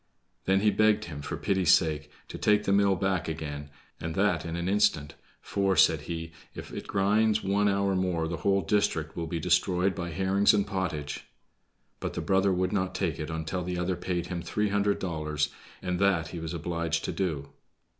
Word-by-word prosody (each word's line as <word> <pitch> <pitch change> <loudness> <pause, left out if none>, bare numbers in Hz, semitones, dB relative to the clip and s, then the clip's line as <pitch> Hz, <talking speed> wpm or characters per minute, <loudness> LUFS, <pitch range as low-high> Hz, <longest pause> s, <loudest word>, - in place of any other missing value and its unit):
Then 95 +1 +3
he 105 0 +4
begged 110 +1 +3
him, 75 -4 -7
for 70 - -4
pity's 95 -3 +2
sake, 75 -3 -1 0.2
to - - -7
take 105 0 +3
the 100 - 0
mill 100 -1 +4
back 95 -1 0
again, 75 -2 -5 0.3
and 80 0 -4
that 95 -5 +1
in 80 - -4
an 85 +1 -2
instant, 100 -8 +2 0.3
"for," 100 -1 0
said - - +5
he, 80 -1 -5 0.2
"if - - -8
it - - -6
grind 105 +2 +3
one 100 +1 +2
hour 100 -1 +1
more 90 -3 0
the 85 +1 -3
whole 100 +4 +2
district 80 -4 0
will 85 -1 -3
be 85 +1 -3
destroyed 90 +2 +2
by 85 0 -4
herrings 95 +5 +3
and 100 -1 +2
pottage." 90 -8 -3 0.7
But - - -4
the - - -3
brother 95 0 +2
would 90 +1 0
not 95 -2 -1
take 90 -5 -1
it 75 - -4
until 80 +3 -3
the 90 0 -3
other 90 +1 0
paid 85 -1 -2
him 90 -1 -4
three 105 +4 -1
hundred 100 0 +1
dollars, 75 -4 -2 0.3
and 90 -1 -1
that 95 -5 +2
he 85 - -6
was 80 +1 -5
obliged 85 0 -2
to - - -2
do. 80 -8 -2
90 Hz, 195 wpm, -28 LUFS, 80-100 Hz, 0.7 s, said